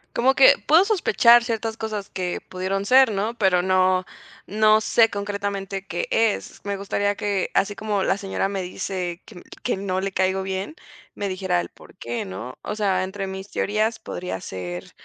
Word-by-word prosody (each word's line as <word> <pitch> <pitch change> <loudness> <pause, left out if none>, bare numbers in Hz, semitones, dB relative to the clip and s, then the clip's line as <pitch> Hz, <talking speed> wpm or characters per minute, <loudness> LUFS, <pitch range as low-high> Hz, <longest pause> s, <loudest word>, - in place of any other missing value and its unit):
Como 260 +3 +4
que 270 - +7
puedo 325 +5 +7
sospechar 240 - +5
ciertas 225 -1 -3
cosas 215 -3 -4
que 180 -1 -3
pudieron 190 +2 -3
ser, 260 0 +6
¿no?, 210 +4 -2
pero 190 -4 +3
no 185 0 +2 0.4
no 215 +1 +4
sé 225 0 +4
concretamente 200 -1 -4
qué 485 - -3
es. 225 - 0
Me 200 -1 -2
gustaría 200 +1 -1
que, 200 -2 -1
así 200 +1 +1
como 210 -2 -1
la 195 - +1
señora 195 0 -2
me 195 -2 -3
dice 180 -1 -4
que, 220 - -14
mm, 175 - -10 0.2
que - - -1
no 190 -1 -2
le 195 0 -2
caigo 190 0 0
bien, 190 +7 -4 0.4
me 200 - -3
dijera 185 - 0
el 85 - -8
por - - -18
qué, 120 0 -4
¿no? 105 +7 -7
O 210 - -4
sea, 195 -3 +1
entre 195 +1 -4
mis 190 +1 -7
teorías 215 +2 0
podría 180 - -5
ser 90 -1 -6
195 Hz, 185 wpm, -23 LUFS, 185-215 Hz, 0.4 s, que